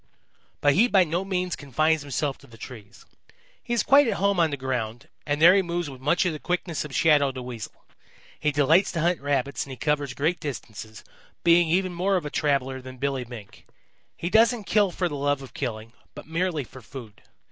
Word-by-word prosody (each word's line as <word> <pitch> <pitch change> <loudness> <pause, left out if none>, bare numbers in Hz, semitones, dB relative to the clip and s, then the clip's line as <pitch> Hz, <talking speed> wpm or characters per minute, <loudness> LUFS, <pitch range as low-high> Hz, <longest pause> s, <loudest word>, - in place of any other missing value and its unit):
"But 145 -1 +4
he 220 - +4
by 195 -6 +5
no 175 +2 -2
means 180 -2 -2
confines 155 +3 +1
himself 140 0 -3
to 140 - -18
the 115 -2 -15
trees. 110 -4 -11 0.6
He 240 - -9
is 235 - +2
quite 280 0 +6
at - - 0
home 200 0 +1
on 165 -1 +4
the 145 - -3
ground, 120 -3 -4 0.2
and 145 0 0
there 170 +3 +8
he 195 - +4
moves 175 -4 -3
with 130 -1 -12
much 150 +7 +2
of 175 - 0
the 155 - -6
quickness 175 -1 -2
of 150 -3 -8
Shadow 150 -5 +4
the 130 -1 -7
Weasel. 120 -4 -8 0.5
He 150 - +1
delights 150 +6 +3
to 165 - -1
hunt 175 0 +1
Rabbits 140 -1 -1
and - - -12
he 130 - -7
covers 145 -1 -1
great 160 +5 0
distances, 110 - -7 0.4
being 170 -1 +5
even 185 +2 +1
more 190 +3 +1
of 175 -5 -1
a 150 - -5
traveller 135 -3 0
than 130 0 -10
Billy 135 -1 -2
Mink. 115 -4 -12 0.5
He 175 - -4
doesn't 230 0 +4
kill 205 0 +2
for 180 +1 -1
the 160 - -6
love 145 0 0
of 135 - -12
killing, 115 -3 -5 0.2
but - - -9
merely 165 -1 -1
for 130 +1 -13
food. 115 -3 -11
150 Hz, 210 wpm, -25 LUFS, 130-175 Hz, 0.6 s, there